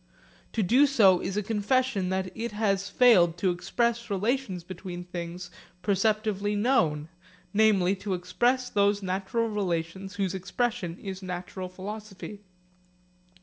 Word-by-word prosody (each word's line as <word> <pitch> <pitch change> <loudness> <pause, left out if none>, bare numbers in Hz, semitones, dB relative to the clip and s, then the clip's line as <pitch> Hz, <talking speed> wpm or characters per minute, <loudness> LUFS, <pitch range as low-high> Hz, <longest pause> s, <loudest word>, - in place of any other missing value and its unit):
To 220 - +1
do 255 +10 +5
so 200 -10 +5
is 195 - -3
a 210 - 0
confession 215 -1 +1
that 190 -1 -2
it 230 0 -4
has 200 -2 0
failed 180 -9 +5
to 185 0 +2
express 235 +6 -1
relations 205 -2 -1
between 180 0 -7
things 175 0 -6 0.3
perceptively 205 +1 +1
known, 165 - +2 0.5
namely 200 -3 +4
to 190 0 -2
express 240 +9 +1
those 200 -1 +2
natural 195 +5 -1
relations 190 -2 -3
whose 195 -2 -1
expression 190 -1 -2
is 190 -1 -7
natural 185 0 -5
philosophy. 205 +1 -8
195 Hz, 125 wpm, -27 LUFS, 185-220 Hz, 0.5 s, do